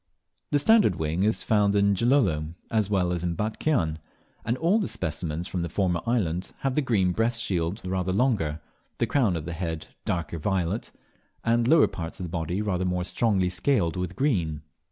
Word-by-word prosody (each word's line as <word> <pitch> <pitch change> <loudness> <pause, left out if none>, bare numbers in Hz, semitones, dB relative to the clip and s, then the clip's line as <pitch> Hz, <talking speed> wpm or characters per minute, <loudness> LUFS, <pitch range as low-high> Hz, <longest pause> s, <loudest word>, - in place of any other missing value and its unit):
The 145 - +3
Standard 195 - +4
Wing 80 +2 -1
is 110 +3 +1
found 105 -2 +2
in 100 0 +4
Gilolo 95 - +1 0.2
as 110 -3 +1
well 90 -3 +1
as 85 -1 -3
in 85 -1 -1
Batchian, 105 - 0 0.4
and 115 +3 -1
all 175 - +3
the 205 - 0
specimens 80 +1 -3
from 90 - -3
the 85 - -3
former 90 -2 0
island 95 -7 -1
have 135 -1 0
the 150 - +2
green 105 -9 +2
breast 115 +4 +1
shield 95 -2 -2
rather 95 0 -1
longer, 95 - +1 0.4
the - - +1
crown 120 -11 +2
of 80 -2 -4
the 85 - -4
head 80 -2 -4
darker 85 -2 -2
violet, 95 +4 -1 0.5
and 115 0 +2
the - - +2
lower 160 0 +7
parts 80 -1 -6
of - - -4
the 85 - -6
body 85 +4 -2
rather 95 -3 -1
more 90 -1 0
strongly 95 -2 +1
scaled 90 - +1
with 90 0 -3
green. 85 - 0
95 Hz, 190 wpm, -26 LUFS, 85-115 Hz, 0.5 s, lower